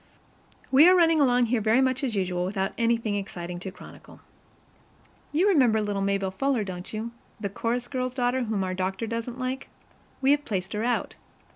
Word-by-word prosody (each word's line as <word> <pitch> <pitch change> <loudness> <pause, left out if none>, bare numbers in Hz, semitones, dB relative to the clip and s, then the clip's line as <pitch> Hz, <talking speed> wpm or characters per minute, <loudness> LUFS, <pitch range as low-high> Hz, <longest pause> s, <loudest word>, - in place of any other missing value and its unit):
We 290 +6 +8
are 370 - +6
running 330 -3 +4
along 250 -3 +4
here 235 - +2
very 220 +4 +3
much 265 +1 +1
as 245 -5 -1
usual 180 -2 -1
without 195 +1 -1
anything 230 -2 +1
exciting 180 -3 -5
to 190 - -6
chronicle. - - -14 1.1
You 340 +7 +2
remember 255 - +4
little 205 -2 -2
Maybelle 195 -1 0
Fuller, 255 +3 0
don't 180 -2 -7
you 220 +2 -4 0.3
the 200 -2 -3
chorus 235 +4 -2
girl's 255 -1 -3
daughter 250 0 0
whom 215 -3 -1
our 185 0 -2
doctor 190 +4 -2
doesn't 230 +2 -4
like? 255 +1 -4 0.5
We 270 +1 +3
have 290 0 +2
placed 190 -6 -3
her 210 +1 -2
out. 245 0 -1
230 Hz, 180 wpm, -26 LUFS, 195-255 Hz, 1.1 s, We